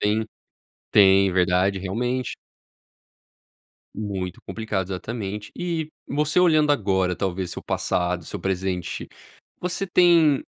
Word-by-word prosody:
Tem 110 +2 +1 0.6
tem, 95 -1 +6
verdade, 95 +2 +2
realmente. 120 +7 -2 1.6
Muito 95 -4 -4
complicado, 105 -4 -3
exatamente 105 +1 -5
E. 165 -3 -2 0.2
você 150 +4 +1
olhando 155 -4 +4
agora, 95 -6 +1
talvez, 95 -1 -2
seu - - -7
passado 90 -1 -1
seu 100 - -6
presente 95 -1 -2 0.6
você 180 +2 -2
tem 170 -5 +5
100 Hz, 100 wpm, -24 LUFS, 95-145 Hz, 1.6 s, tem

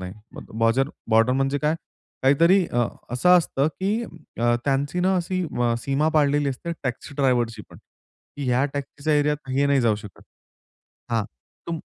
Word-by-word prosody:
नाही." 90 0 -6 0.2
मग - - -11
बॉज़र 115 +4 +2 0.2
बॉर्डर 115 +3 +4
म्हणजे 135 +2 0
काय? 150 +2 +1 0.5
काहीतरी 170 +8 +5
अ, 120 -4 0 0.2
असं 180 +9 +5
असतं, 150 -3 0
की 205 +5 0 0.4
अ, 120 0 +3
त्यांची 145 +5 0
ना, 190 +1 +2
अशी 185 +1 -1
म 120 -1 +1
सीमा 140 +5 0
पाडलेली 145 -1 +3
असते 140 +6 -4
टॅक्सी 130 +3 -4
ड्रायव्हरची 120 -5 +1
पण, - - -13 0.6
की 145 - -4
ह्या 125 +2 +2
टॅक्सीच्या 145 +2 -2
ऐरियात 150 -1 -1
हे 140 +2 +2
नाही 140 -1 +3
जाऊ 115 -3 +3
शकत. 105 -2 -12 0.9
हां, 115 -2 +1 0.4
तुम 165 -1 -3
140 Hz, 160 wpm, -24 LUFS, 120-155 Hz, 0.9 s, काहीतरी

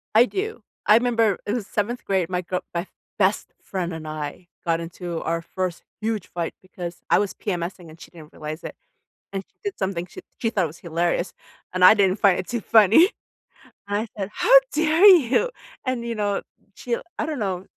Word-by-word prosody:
I 230 +2 +8
do. 430 - -4 0.2
I 215 +2 +7
'member 230 -5 +2
it 205 - -1
was 230 -5 -3
7th 230 +4 -2
grade, 190 -4 +1
my 180 -1 -1
girl 180 +1 -3
my 170 - 0
f 190 - -12 0.3
best 195 +1 +1
friend 180 -3 -3
and 160 -1 -7
I 155 +3 -6 0.2
got 165 -1 +1
into 170 0 -5
our 165 0 -1
first 180 0 -4 0.2
huge 220 -3 -2
fight 170 -2 -4
because 180 -2 -8
I - - +5
was 205 -1 -1
PMS-ing, 175 -3 -4
and 160 +1 -14
she - - -13
didn't 160 -3 -13
realize 155 +1 -6
it. - - -7 0.6
And 195 -1 -3
she - - -42
did 405 -1 -4
something 185 -2 -2
sh - - -15 0.2
she 225 - 0
thought 190 -6 +1
was 155 +2 -10
hilarious, 170 +1 -1 0.4
and 185 0 +2
I 185 - +10
didn't 195 -1 +2
find 195 -3 +5
it 185 - -5
too 240 -1 -2
funny. 225 - +6 0.8
I 205 +3 -1
said, 200 -1 -3
“How - - +1 0.2
dare 315 +4 +3
you? 350 - +6 0.3
“And, 255 -3 -1
you 235 0 -3
know, 205 -2 -1 0.3
she 240 -1 -2 0.2
I - - 0
don't 310 -3 -3
know, 190 -3 -2
195 Hz, 200 wpm, -24 LUFS, 175-230 Hz, 0.8 s, I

